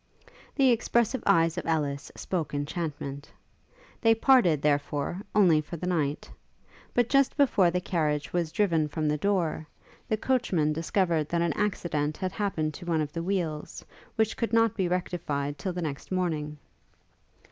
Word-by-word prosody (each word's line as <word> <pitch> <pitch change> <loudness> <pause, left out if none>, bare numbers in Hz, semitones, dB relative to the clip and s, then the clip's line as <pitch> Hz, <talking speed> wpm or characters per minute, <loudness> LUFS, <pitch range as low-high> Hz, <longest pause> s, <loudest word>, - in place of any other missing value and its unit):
The 270 -3 +4
expressive 235 +1 +1
eyes 165 +1 +3
of - - -7
Ellis 145 -3 -1
spoke 165 -5 -3
enchantment. 145 -1 -4 0.7
They 225 -1 +5
parted, 225 - +4
therefore, 145 +4 0
only 175 -7 +5
for 160 +3 -8
the 180 - -5
night; 155 -5 -1 0.7
but 245 -1 +3
just 275 +1 +2
before 225 - +4
the 180 +1 -1
carriage 155 -5 -1
was 170 -3 0
driven 165 -5 +1
from 155 +1 -2
the 150 0 0
door, 170 -5 0 0.4
the 220 - +1
coachman 195 -12 +1
discovered 165 -1 0
that 170 0 +1
an 170 -3 0
accident 155 -7 -1
had 185 -1 -2
happened 160 -7 -2
to 175 - -10
one 165 -2 +1
of 150 -1 -4
the 165 - -3
wheels, 170 -5 -3 0.3
which 220 0 +1
could 230 -1 -2
not 225 -2 +3
be 190 -3 0
rectified 160 -5 -2
till 190 - -2
the 180 -1 -4
next 145 +1 -5
morning. 155 -5 -1
170 Hz, 160 wpm, -28 LUFS, 150-200 Hz, 0.7 s, They